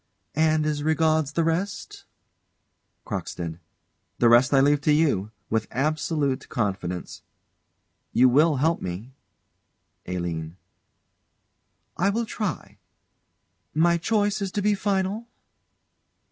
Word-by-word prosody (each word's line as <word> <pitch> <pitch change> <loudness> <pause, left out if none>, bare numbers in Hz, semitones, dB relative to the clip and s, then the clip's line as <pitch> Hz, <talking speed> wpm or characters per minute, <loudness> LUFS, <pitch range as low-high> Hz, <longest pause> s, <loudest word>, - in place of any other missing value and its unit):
And, 155 0 +2
as 150 -1 -1
regards 155 -1 +1
the 165 - +1
rest 175 +5 -3 1.0
CROCKSTEAD. 85 -1 -5 0.6
The 120 - +4
rest 120 +2 +5
I 135 - +5
leave 145 +1 +3
to 150 - +2
you, 145 -10 +2 0.2
with 110 -1 0
absolute 145 0 -1
confidence. 95 -5 -3 0.9
You 130 - +5
will 150 +5 +4
help 160 +5 +1
me? 95 +9 -6 0.9
ALINE. 85 -2 -4 1.4
I 190 +3 +2
will 230 +3 0
try. 215 -3 -5 1.0
My 170 +2 +3
choice 205 +2 +1
is 195 -2 -2
to 205 - -1
be 210 0 +3
final? 200 +2 -1
150 Hz, 105 wpm, -25 LUFS, 120-170 Hz, 1.4 s, rest